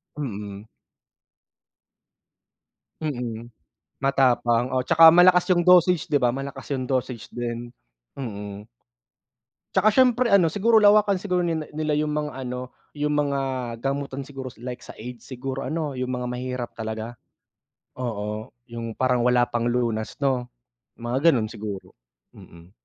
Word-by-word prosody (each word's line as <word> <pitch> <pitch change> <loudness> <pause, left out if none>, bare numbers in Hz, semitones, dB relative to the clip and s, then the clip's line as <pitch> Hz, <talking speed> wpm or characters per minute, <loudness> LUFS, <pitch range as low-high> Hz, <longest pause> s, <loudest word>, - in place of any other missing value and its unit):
Mm. 105 -7 -6 2.3
Mm, 120 -6 -4 0.5
matapang, 125 -3 +2
oo, 130 0 +1
'tsaka 165 +1 +8
malakas 180 +2 +5
yung 175 -1 +3
dosage, 180 -2 +5
'di 145 - +2
ba? 120 - +4
Malakas 135 +3 -6
yung 130 -2 -2
dosage 125 -3 -2
din. 120 0 -5 0.4
Mm. 105 -5 -7 1.1
Tsaka 215 - +5
siyempre 250 +1 +4
ano, 195 -4 +6
siguro 220 +7 +3
lawakan 205 -2 +5
siguro 180 -2 0
nila 160 -3 -2
nila 155 -1 -1
yung 150 0 -1
mga 150 0 -2 0.2
ano, 125 0 -5 0.2
yung 150 0 0
mga 140 -1 0 0.4
gamutan 140 0 -2
siguro, 135 -1 -8 0.2
like 125 -1 -5
sa - - -12
AIDS. 120 +2 -9
Siguro 130 +1 -5
ano, 155 +1 -2
yung 130 0 -2
mga 125 0 -3
mahihirap 125 -1 -4
talaga. 110 +1 -5 0.8
Oo, 110 -3 -4 0.2
yung 115 -1 -6
parang 125 -2 +1
wala 125 0 +4
pang 120 0 -1
lunas 115 -3 -1
'no, 130 -3 +1 0.5
mga 125 +7 +2
gano'n 115 -6 0
siguro, 105 -4 -7 0.4
mm. 85 +1 -15
130 Hz, 130 wpm, -24 LUFS, 120-150 Hz, 2.3 s, tsaka